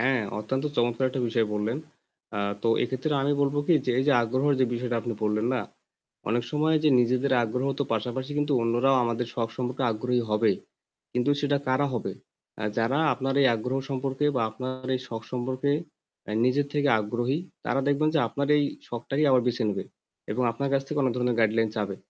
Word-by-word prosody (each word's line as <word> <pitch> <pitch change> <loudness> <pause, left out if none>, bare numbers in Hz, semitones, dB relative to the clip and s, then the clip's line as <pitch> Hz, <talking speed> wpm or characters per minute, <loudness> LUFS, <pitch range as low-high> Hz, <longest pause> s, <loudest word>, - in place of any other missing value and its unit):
হ্যাঁ, 130 -1 +2 0.2
অত্যন্ত 130 +6 -2
চমৎকার 120 +2 +2
একটা 130 +1 -3
বিষয় 115 -1 +1
বললেন। 110 +5 -1 0.6
আ - - -1 0.2
তো 115 - +1
এক্ষেত্রে 130 +5 -1
আমি 145 +1 +2
বলব 140 0 +2
কি 175 - +5
যে, 125 - +1
এই 130 - +2
যে 145 - +5
আগ্রহর 130 +5 +1
যে 130 - +6
বিষয়টা 120 0 -2
আপনি 120 +1 -3
বললেন 105 +1 +1
না, 125 - 0 0.7
অনেক 120 +3 +1
সময় 155 +1 +2
যে - - +6
নিজেদের 130 +3 +1
আগ্রহ 125 +4 -1
তো 140 - +1
পাশাপাশি 125 +4 -2
কিন্তু 145 0 +1
অন্যরাও 120 +4 +3
আমাদের 115 +1 -1
শখ 115 -1 -1
সম্পর্কে 130 +1 -2
আগ্রহী 125 +3 0
হবে। 105 +1 +3 0.6
কিন্তু 125 +3 +1
সেটা 145 0 +2
কারা 130 +2 +2
হবে? 115 - -2 0.4
অ্যা 110 - -3
যারা 115 +5 +1 0.2
আপনার 135 +1 -2
এই - - +6
আগ্রহ 125 +4 -2
সম্পর্কে 135 +1 -2
বা 120 - +2
আপনার 130 +3 -6
এই 130 - -1
শখ 115 -1 -5
সম্পর্কে 130 +3 -1 0.5
অ্যা 105 - -5
নিজের 140 +3 +2
থেকে 145 -1 +2
আগ্রহী; 120 +6 -1 0.3
তারা 135 - +1
দেখবেন 145 +2 +2
যে - - +4
আপনার 140 +4 -2
এই 145 - +3 0.2
শখটাকেই 135 +5 -1
আবার 130 -2 +5
বেছে 120 -1 0
নেবে 105 - -2 0.5
এবং 125 - 0
আপনার 140 +4 -2
কাছ 135 -1 +2
থেকে 150 +1 -3
কোন 135 -2 +3
ধরনের 125 -1 +1
গাইডলাইন 110 0 +3
চাবে। 100 -3 -2
125 Hz, 195 wpm, -27 LUFS, 115-135 Hz, 0.7 s, যে